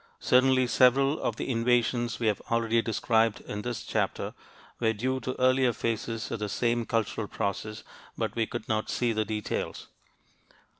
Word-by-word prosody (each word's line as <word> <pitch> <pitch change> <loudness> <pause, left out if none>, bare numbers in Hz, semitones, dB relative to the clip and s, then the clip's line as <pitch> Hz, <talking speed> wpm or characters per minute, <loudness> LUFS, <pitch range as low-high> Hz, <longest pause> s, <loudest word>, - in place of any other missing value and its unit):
Certainly 130 0 +4
several 135 +4 +4
of - - -1
the - - -4
invasions 120 0 +1
we 120 - -1
have 105 -2 +1
already 115 0 +2
described 115 -1 +1
in 105 - -5
this 120 +1 -4
chapter - - -2 0.5
were 110 -2 +2
due 130 +5 -1
to 130 +1 -5
earlier 130 -1 +4
phases 115 0 -3
of - - -3
the 105 -1 -3
same 120 +2 0
cultural 110 -1 -1
process, 105 +3 -3 0.3
but - - -2
we 115 -2 0
could 120 -2 -6
not 110 -1 -1
see 120 -2 0
the 110 0 0
details. 105 0 -4
115 Hz, 160 wpm, -28 LUFS, 110-125 Hz, 0.5 s, Certainly